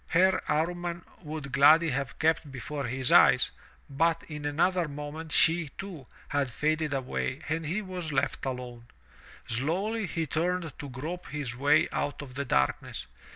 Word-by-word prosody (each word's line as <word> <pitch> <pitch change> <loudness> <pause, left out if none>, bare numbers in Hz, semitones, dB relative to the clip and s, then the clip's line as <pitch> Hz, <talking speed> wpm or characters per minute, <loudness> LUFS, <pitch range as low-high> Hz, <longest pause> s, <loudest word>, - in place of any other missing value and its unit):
Her 185 +3 +4
Amman 170 +2 -1 0.2
would 150 -4 -6
gladly 155 +4 +6
have 135 0 -3
kept 160 -2 +1
before 140 +2 -4
his 130 +2 0
eyes, 125 0 +6 0.4
but 165 +4 +1
in 150 -2 -7
another 170 +4 +2
moment 150 +2 -6
she, 165 -2 +3
too, 175 -10 -7 0.2
had 145 -2 0
faded 155 +4 0
away 135 +1 -2
and 160 0 -2
he 200 +7 -1
was 180 -4 -5
left 140 - 0
alone. 125 -2 -6 0.6
Slowly 190 - -1
he 165 -1 -2
turned 165 +1 -1
to 145 -3 -6
grope 155 +8 -6
his 140 -5 -4
way 145 +5 +4
out 145 0 -2
of 130 -3 -10
the 140 +2 -3
darkness. 65 - 0
150 Hz, 155 wpm, -29 LUFS, 135-165 Hz, 0.6 s, gladly